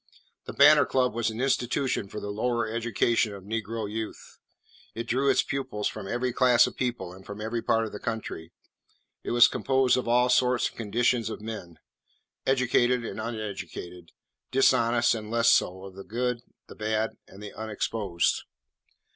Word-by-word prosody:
The - - -7
Banner - - +7
Club 125 -3 +1
was 115 0 0
an 110 +1 -6
institution 130 -3 0
for 105 +2 -7
the 105 - -5
lower 115 +2 -1
education 115 -1 0
of 95 - -11
negro 110 +1 -3
youth. 110 +1 -7 0.6
It 115 - -3
drew 130 +4 +1
its - - +3
pupils 130 -7 -3
from 105 -3 -6
every 120 +3 -1
class 125 -2 +5
of - - -6
people 120 -8 -3
and 95 +1 -13
from 100 +1 -9
every 110 +2 -3
part 115 0 +1
of 110 - -7
the 105 - -7
country. 110 -8 -5 0.7
It - - -5
was 120 0 +7
composed 130 -2 +2
of 125 - -2
all 125 +1 +3
sorts 125 0 +3
and - - -21
conditions 115 +1 0
of - - -6
men, 105 -6 -8 0.7
educated 125 -2 +2
and 110 - -5
uneducated, 95 -6 -6 0.4
dishonest 120 -3 +3
and 110 -2 -5
less 115 0 +4
so, 95 +1 +2
of 95 - -10
the 95 +1 -10
good, 125 +2 -2 0.2
the - - -12
bad, 110 +1 -1 0.2
and 100 +2 -13
the 105 - -8
unexposed. 105 -4 -1
115 Hz, 170 wpm, -27 LUFS, 105-120 Hz, 0.7 s, Banner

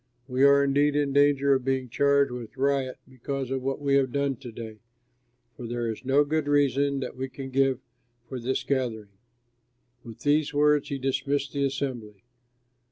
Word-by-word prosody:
We 130 0 0
are 140 0 +6
indeed 145 +1 +2
in 145 -2 0
danger 140 -1 +4
of 130 -1 0
being 130 0 -1
charged 140 +2 +2
with 120 -1 -8
riot 135 -1 0
because 130 +1 -5
of 135 -1 -1
what 135 +2 -2
we 140 -1 0
have 130 -2 +1
done 140 0 0
to 125 -2 -9
day, 110 -1 -9 0.8
for 120 - -7
there 120 0 -3
is 110 - -9
no 135 +3 +3
good 150 0 -1
reason 140 -1 +2
that - - -5
we 130 +1 -4
can 135 0 -8
give 135 -1 +2 0.5
for 130 - -6
this 130 +3 -2
gathering." 120 -6 -2 0.9
With 115 -2 -11
these 145 0 +1
words 150 0 +3
he 140 - -2
dismissed 140 +1 -1
the 140 -1 -1
assembly. 125 -7 -4
135 Hz, 175 wpm, -26 LUFS, 130-140 Hz, 0.9 s, are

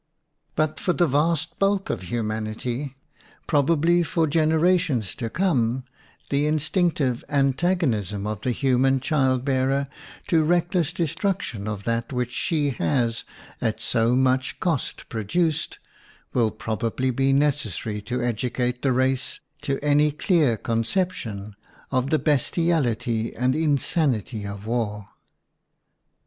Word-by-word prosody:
But 155 0 0
for 180 - +1
the 175 - +3
vast 160 +2 0
bulk 195 0 +1
of - - -3
humanity, 110 +3 -3
WOMAN 135 - -4
AND 135 - -15
WAR 135 - -31
probably 165 +3 +3
for 165 0 +1
generations 160 - +2
to 115 - -4
come, 130 -8 +1 0.5
the 145 +1 +2
instinctive 155 -4 +1
antagonism 135 - +1
of 105 -2 -3
the - - -1
human 135 +1 +2
child 130 -2 +1
bearer 135 0 +1 0.4
to 165 -2 +3
reckless 175 0 +1
destruction 165 - -2
of 105 -2 -4
that 115 +2 -1
which 125 -1 -2
she 145 +1 0
has 115 +2 0 0.4
at 110 -1 0
so 115 +1 +2
much 130 0 +1
cost 165 -7 -2
pro 115 - -4
duced 160 - 0 0.6
will 115 -3 +3
probably 115 +4 -2
be 135 +2 +1
necessary 135 - 0
to 120 +4 -3
educate 125 +1 -1
the 135 - +2
race 130 +1 0 0.2
to 140 -2 -1
any 150 +1 +4
clear 150 - +2
conception 115 - -2 0.4
of 130 0 +1
the 155 - +3
bestiality 130 -7 +1
and 125 +2 +1
insanity 140 - 0
of 100 0 -7
war. 105 -3 -2
130 Hz, 130 wpm, -24 LUFS, 115-155 Hz, 0.6 s, any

